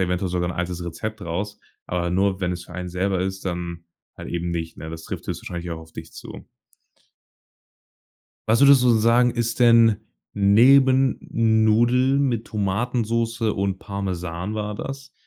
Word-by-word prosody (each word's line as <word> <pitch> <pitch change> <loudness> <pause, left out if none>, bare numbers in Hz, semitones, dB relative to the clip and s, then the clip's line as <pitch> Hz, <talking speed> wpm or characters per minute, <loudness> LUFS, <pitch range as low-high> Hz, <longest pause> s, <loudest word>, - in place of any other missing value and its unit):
eventuell 90 +1 -1
sogar 90 0 -1
'n - - -4
altes 90 0 -3
Rezept 110 +6 -6
raus." 100 +5 -4 0.3
Aber 85 -1 -2
nur, 95 +1 +1
wenn 90 -1 -1
es 90 -1 -5
für - - -14
einen 90 -1 -5
selber 95 +1 -1
ist, 95 0 -4
dann 85 -2 -5 0.3
halt - - -8
eben 85 0 -3
nicht, 85 -1 -4
ne? 80 +1 -8
Das 80 0 -8
trifft - - -7
jetzt - - -3
wahrscheinlich 85 0 -6
auch 80 - -4
auf 80 0 -14
dich 80 0 -10
zu. - - -11 2.0
Was 115 +5 +3
würdest 140 -2 +7
du 125 -1 +5
sagen, 115 +2 +4
ist 120 0 -2
denn 115 -3 +6 0.4
neben 130 +6 +4
Nudeln 115 +4 +2
mit 120 -5 -1
Tomatensoße 115 +2 -1
und 95 -1 -2
Parmesan 95 -1 -4
war 105 -1 -3
das, 135 +4 -7
100 Hz, 160 wpm, -23 LUFS, 90-115 Hz, 2.0 s, würdest